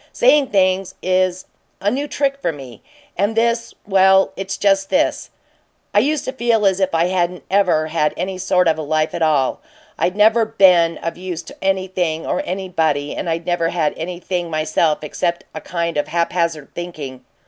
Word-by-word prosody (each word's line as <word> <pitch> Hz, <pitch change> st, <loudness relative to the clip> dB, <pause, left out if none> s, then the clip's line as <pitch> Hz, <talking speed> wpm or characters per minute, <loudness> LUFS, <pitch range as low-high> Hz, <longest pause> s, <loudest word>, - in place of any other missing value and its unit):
Saying 300 Hz, -, +4 dB
things 190 Hz, -2 st, +1 dB
is 185 Hz, 0 st, +1 dB, 0.3 s
a 205 Hz, -, 0 dB
new 280 Hz, +3 st, -2 dB
trick 275 Hz, -1 st, 0 dB
for 170 Hz, -, 0 dB
me, 130 Hz, -7 st, -11 dB, 0.3 s
and 205 Hz, +4 st, 0 dB
this 235 Hz, +1 st, 0 dB
well, 190 Hz, -1 st, +4 dB
it's 195 Hz, 0 st, -4 dB
just 195 Hz, -1 st, +2 dB
this: -, -, 0 dB, 0.6 s
I 205 Hz, -, +5 dB
used 290 Hz, +6 st, 0 dB
to -, -, -2 dB
feel 235 Hz, -4 st, +1 dB
as 190 Hz, -1 st, +2 dB
if 190 Hz, -3 st, 0 dB
I 165 Hz, +1 st, +3 dB
hadn't 180 Hz, -1 st, -1 dB
ever 185 Hz, -5 st, +3 dB
had 155 Hz, -1 st, 0 dB
any 185 Hz, +1 st, -3 dB
sort 180 Hz, -1 st, +2 dB
of 160 Hz, -1 st, +2 dB
a -, -, -2 dB
life 155 Hz, +1 st, 0 dB
at 170 Hz, -, -4 dB
all. 150 Hz, -5 st, +1 dB, 0.4 s
I'd 180 Hz, -, 0 dB
never 220 Hz, +2 st, +4 dB
been 185 Hz, -7 st, +4 dB
of 165 Hz, 0 st, -5 dB
use 180 Hz, -2 st, -5 dB
to -, -, -12 dB
anything 185 Hz, -4 st, -1 dB
or -, -, -1 dB
anybody, 160 Hz, -6 st, -1 dB
and 175 Hz, -, -3 dB
I'd 165 Hz, 0 st, -2 dB
never 175 Hz, -2 st, 0 dB
had 165 Hz, -3 st, 0 dB
anything, 175 Hz, +1 st, -4 dB
myself, 155 Hz, 0 st, 0 dB
except 170 Hz, +3 st, -2 dB
a -, -, -6 dB
kind 170 Hz, -2 st, -3 dB
of 145 Hz, -, 0 dB
haphazard 170 Hz, -3 st, -1 dB
thinking. 150 Hz, -7 st, -7 dB
180 Hz, 180 wpm, -19 LUFS, 165-195 Hz, 0.6 s, I